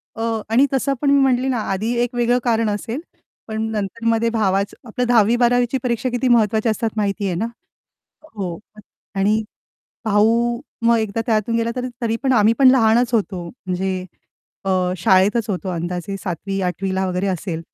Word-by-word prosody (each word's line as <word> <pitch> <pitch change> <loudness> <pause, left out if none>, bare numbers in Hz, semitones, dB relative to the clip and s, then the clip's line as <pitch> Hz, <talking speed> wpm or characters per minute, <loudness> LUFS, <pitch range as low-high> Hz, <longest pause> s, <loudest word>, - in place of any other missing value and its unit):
अ, 225 - -6 0.3
आणि 240 +5 +4
तसं 275 +1 +1
पण 285 - +2
मी 280 - +5
म्हंटले 260 -1 +2
ना 260 -2 0
आधी 215 +5 -1
एक 245 0 -4
वेगळं 240 0 +2
कारण 230 -2 +1
असेल, 225 +5 -3 0.5
पण 220 -1 -3
नंतरमध्ये 225 +2 0
भावाचं 200 0 -1
आपलं 250 +3 -2
10वी 230 -1 +4
12वी 245 0 +3
च्या 265 - 0
परीक्षा 245 0 -1
किती 245 +1 -1
महत्वाची 220 -2 +3
असतात 225 +1 0
माहितीये 200 -2 -1
ना? 215 - -1 0.9
हो 180 -4 -4 0.6
आणि 210 +3 +2 0.6
भाऊ 230 +3 +2 0.3
मग 235 0 +5
एकदा 220 0 -2
त्यातून 225 0 +1
गेला 230 0 0
तर 250 0 -2 0.2
तरी 225 -1 0
पण 265 - +2
आम्ही 220 -2 +5
पण 270 -2 +7
लहानच 240 -1 +3
होतो 195 -5 -1
म्हणजे 185 -3 -3 0.6
अ, 195 - -1 0.3
शाळेतच 195 +6 +3
होतो, 190 0 -3
अंदाजे 175 +3 -4
7वी 195 +2 -3
8वी 190 +1 -2
ला 190 0 0
वगैरे 180 +2 -1
असेल 175 -2 -3
220 Hz, 165 wpm, -20 LUFS, 195-240 Hz, 0.9 s, पण